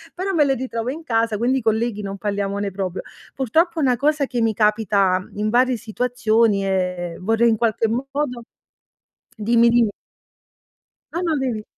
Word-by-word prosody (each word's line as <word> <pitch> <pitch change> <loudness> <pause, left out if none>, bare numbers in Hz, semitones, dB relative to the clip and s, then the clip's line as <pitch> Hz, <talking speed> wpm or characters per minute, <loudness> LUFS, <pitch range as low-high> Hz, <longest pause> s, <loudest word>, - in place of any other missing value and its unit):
però 380 +2 -2
me 310 -4 +4
le 275 - +2
ritrovo 235 -2 -4
in 320 +4 -8
casa. 225 -5 0
Quindi 245 +5 +1
i - - -2
colleghi 220 -1 0
non 200 -1 -5
parliamone 200 -1 -2 0.2
proprio. 190 -1 -4 0.3
Purtroppo 325 +7 +1
è - - +1
una 255 -3 +2
cosa 295 +1 +1
che 245 - -3
mi 225 -1 +2
capita 205 -3 +2
in 210 +1 -1
varie 250 +2 +2
situazioni 225 -2 +1
e 195 - 0 0.3
e 170 -1 -6
vorrei 225 +4 +2
in 220 - +2
qualche 225 0 +1
modo 255 +1 -3 0.9
dimmi, 235 +2 +3
dimmi. 235 -2 +3 1.3
Ah 345 - -1
no, 335 -2 0
devi 245 -6 -2
230 Hz, 170 wpm, -21 LUFS, 210-260 Hz, 1.3 s, me